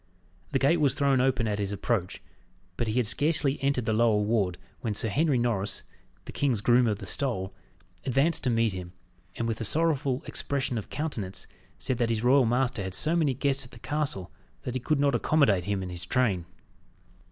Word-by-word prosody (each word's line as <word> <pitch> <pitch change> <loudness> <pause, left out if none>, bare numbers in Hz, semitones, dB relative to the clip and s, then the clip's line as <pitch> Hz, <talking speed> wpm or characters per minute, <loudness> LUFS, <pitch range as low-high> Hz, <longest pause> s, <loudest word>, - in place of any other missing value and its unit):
The - - +2
gate 165 +5 +3
was 140 -3 +3
thrown 140 -3 +2
open 130 -3 +1
at 105 -1 -1
his 100 -1 -2
approach, 100 -2 -2 0.5
but 120 - -2
he 110 - -1
had 125 -2 +2
scarcely 145 +3 +1
entered 135 -3 +1
the 110 - +1
lower 110 -1 +3
ward 105 -4 0 0.2
when 110 -3 -3
Sir 110 - +1
Henry 145 +4 +2
Norris, 105 -5 -1 0.4
the - - -7
king's 130 -7 0
groom 120 +2 +4
of 105 -2 0
the - - -8
stole, 105 -9 -2 0.5
advanced 140 +5 +1
to - - +3
meet 115 -3 +2
him, 90 -1 -7 0.4
and, 115 - -2
with 115 0 -3
a - - 0
sorrowful 145 0 +1
expression 135 -4 -1
of 105 - -9
countenance, 115 -12 -2 0.3
said 130 - -2
that 120 -1 +1
his 115 -1 -1
royal 130 0 +5
master 125 -1 0
had 95 -1 -3
so 160 +2 +2
many 150 -6 +2
guests 135 +1 +1
at 125 - -10
the 120 - -13
castle, 140 - -3 0.3
that 125 - -4
he 130 - -1
could 150 +4 0
not 140 0 +3
accommodate 120 - +2
him 100 -1 -1
and 90 - -6
his 90 -1 -5
train. 105 -9 +1
120 Hz, 200 wpm, -27 LUFS, 105-140 Hz, 0.5 s, royal